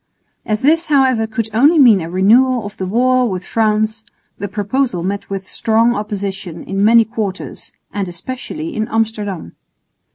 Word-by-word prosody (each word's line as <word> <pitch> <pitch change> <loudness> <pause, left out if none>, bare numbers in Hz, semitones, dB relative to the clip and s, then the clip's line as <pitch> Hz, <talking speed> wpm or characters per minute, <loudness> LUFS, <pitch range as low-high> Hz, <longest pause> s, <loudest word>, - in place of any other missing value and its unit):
As 215 +1 -1
this, 325 +4 +3
however, 260 -6 +2
could 220 0 -3
only 285 +9 +4
mean 235 - +6
a 165 - -5
renewal 230 +6 +3
of 205 - -8
the 190 - -3
war 250 +4 +2
with 185 -2 -4
France, 220 0 0 0.4
the 200 - -3
proposal 205 -1 -1
met 200 +2 -4
with 195 -1 -5
strong 230 +1 +1
opposition 195 -5 -5
in 195 +1 -2
many 230 +1 +6
quarters, 215 -4 -5 0.2
and 200 -2 -2
especially 255 - -6
in 220 -1 -1
Amsterdam. 210 - -3
220 Hz, 155 wpm, -17 LUFS, 195-245 Hz, 0.4 s, mean